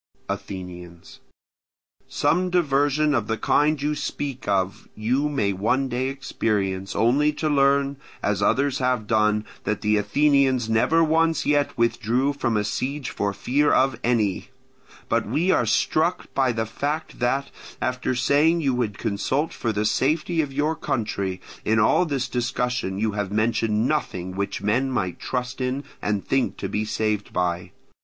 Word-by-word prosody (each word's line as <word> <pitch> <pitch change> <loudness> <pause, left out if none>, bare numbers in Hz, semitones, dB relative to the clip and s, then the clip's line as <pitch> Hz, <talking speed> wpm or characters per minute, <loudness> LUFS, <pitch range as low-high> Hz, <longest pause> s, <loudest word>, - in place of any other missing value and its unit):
Athenians. 90 -3 -7 0.9
Some 180 +2 +1
diversion 150 -3 +2
of 115 -5 0
the 110 - -1
kind 150 +5 +2
you 150 +2 0
speak 140 -3 -4
of 95 -1 -1
you 130 +7 0
may 105 -9 0
one 125 +8 0
day 125 +1 -1
experience, 100 -8 -2
only 140 +6 +3
to 155 +1 -2
learn, 140 -1 +2 0.3
as 100 -1 0
others 140 +6 +2
have 125 -4 0
done, 105 -1 +2 0.2
that 105 -1 -2
the 105 0 +2
Athenians 135 0 +2
never 120 +9 +3
once 165 +1 +2
yet 145 -2 +1
withdrew 120 +3 +1
from 120 -5 0
a 105 - +1
siege 130 +6 -3
for 100 0 -1
fear 140 +8 +1
of 130 -3 +2
any. 110 -5 +1 0.6
But - - 0
we 175 +5 +1
are 120 - +2
struck 160 +10 +1
by 130 -2 +2
the 110 -1 -1
fact 145 +8 -4
that, 135 +3 0 0.3
after 130 0 -1
saying 145 +7 +3
you 135 -4 +1
would 115 -5 -1
consult 130 +9 -1
for 115 - -2
the 105 0 -1
safety 155 +9 +1
of 145 -3 -4
your 150 +4 0
country, 100 -10 -2 0.2
in 110 - +2
all 140 +10 +4
this 135 -4 -1
discussion 125 -4 -2
you 110 +1 0
have 100 -2 -3
mentioned 110 +1 +1
nothing 95 -12 -2
which 100 +1 -3
men 125 +6 +1
might 95 -9 -2
trust 125 0 -3
in 130 +2 -1 0.2
and 105 -1 -2
think 135 -1 0
to - - -3
be 105 +1 -2
saved 105 -1 -1
by. 90 0 -1
125 Hz, 155 wpm, -24 LUFS, 105-140 Hz, 0.9 s, all